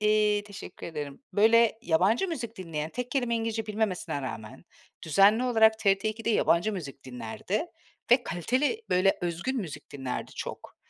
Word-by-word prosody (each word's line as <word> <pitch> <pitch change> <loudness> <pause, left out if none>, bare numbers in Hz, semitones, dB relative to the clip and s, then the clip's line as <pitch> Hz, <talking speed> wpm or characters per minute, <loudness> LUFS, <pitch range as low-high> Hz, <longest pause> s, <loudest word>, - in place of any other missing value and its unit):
iii, 210 -1 +3
teşekkür 200 -3 -9
ederim, 150 - -6
böyle, 225 +1 +4
yabancı 200 - +2
müzik 235 -8 -5
dinleyen, 160 -3 -4
tek 250 +1 -5
kelime 245 -4 0
İngilizce 225 -1 -2
bilmemesine 205 -9 -2
rağmen 130 +3 -7 0.4
düzenli 200 - +4
olarak 220 -3 +4
TRT 200 -1 +2
ikide 225 +1 -2
yabancı 210 -1 +2
müzik 140 -7 -7
dinlerdi 125 - -4 0.4
ve 245 0 +6
kaliteli, 260 - 0
böyle, 185 +2 +3
özgün 175 +10 -2
müzik 175 - -7
dinlerdi 135 -3 -5
çok. - - -7
210 Hz, 145 wpm, -28 LUFS, 165-230 Hz, 0.4 s, ve